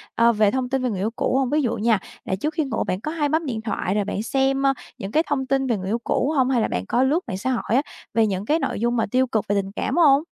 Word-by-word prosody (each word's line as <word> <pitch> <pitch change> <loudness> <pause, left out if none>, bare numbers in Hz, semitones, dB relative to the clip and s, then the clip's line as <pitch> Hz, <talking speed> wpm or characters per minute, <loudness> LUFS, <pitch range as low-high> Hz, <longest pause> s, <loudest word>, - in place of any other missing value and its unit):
ờ, 235 0 +5
về 210 -2 +3
thông 255 -1 -1
tin 265 -1 0
về 250 - +1
người 200 -5 -3
yêu 210 +4 -1
cũ 260 - +1
hông? 265 -2 +1
Ví 300 +3 +2
dụ 240 -4 0
nha, 220 -1 +2 0.3
là 190 - -1
trước 300 +12 -2
khi 315 - 0
ngủ 270 - -2
bạn 185 +2 -3
có 305 - -3
hay 305 -3 0
bấm 315 +2 0
điện 230 -6 -3
thoại 205 -3 -2
rồi 205 -1 +1
bạn 205 - -3
xem, 270 +2 +1
ờ, 275 0 +4 0.2
những 195 - -6
cái 315 +7 +3
thông 280 -3 -1
tin 270 0 0
về 235 -4 +1
người 190 0 -5
yêu 230 +3 0
cũ 275 - 0
hông? 260 -2 +3
Hay 250 -3 +2
là - - +1
bạn 90 +1 -3
có 245 - +2
lướt 285 +6 +2
mạng 185 - -3
xã 260 +7 -1
hội 245 - -1
á - - +4 0.3
về 225 0 +3
những 195 0 -2
cái 310 +7 +2
nội - - -2
dung 240 +2 +1
mà 225 - +2
tiêu 260 +1 +3
cực 220 -3 -1
về 205 - +1
tình 195 0 -9
cảm - - -2
hông? 290 -4 +5
250 Hz, 325 wpm, -23 LUFS, 210-275 Hz, 0.3 s, ờ